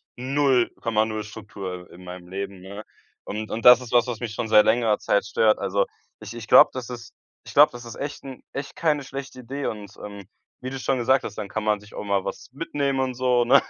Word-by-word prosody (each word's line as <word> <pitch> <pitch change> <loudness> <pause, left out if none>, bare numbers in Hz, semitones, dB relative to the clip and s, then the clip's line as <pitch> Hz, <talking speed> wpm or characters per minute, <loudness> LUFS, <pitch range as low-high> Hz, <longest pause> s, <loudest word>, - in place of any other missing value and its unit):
0,0 120 -5 +1
Struktur 95 -4 -8
in 90 - -13
meinem 90 0 -9
Leben, 100 0 -5
ne? 100 +3 -8 0.4
Und 110 +1 -5
und 115 - -4
das 125 0 +9
ist 125 - -9
was, 120 +1 +4
was 120 -2 -4
mich 115 -3 -4
schon 110 - -3
seit 105 -1 +7
längerer 110 -2 +3
Zeit 100 - +1
stört. 110 0 +2
Also, 100 +1 +1 0.4
ich - - -8
ich 115 -2 -8
glaube, - - +8
das 125 -2 -6
ist 115 -3 -8 0.3
ich - - -10
glaube, - - +7
das 120 0 -9
ist 115 - -8
echt 145 +1 -6
'n 135 -2 -9
echt 140 +1 -6
keine 150 -3 +1
schlechte 135 -1 -7
Idee 135 +4 -5
und, 105 -2 -6
ähm, 100 -2 -9 0.3
wie 130 - -4
du 135 - -5
schon 130 +1 0
gesagt 130 +2 +3
hast, - - -7
dann 105 -2 -4
kann 110 +2 -4
man 105 -1 +1
sich 105 +1 -17
auch - - -5
mal 100 -2 0
was - - -6
mitnehmen 140 -2 -2
und 130 -1 0
so, 125 -1 +2
ne? 135 +3 +6
115 Hz, 230 wpm, -24 LUFS, 105-130 Hz, 0.4 s, das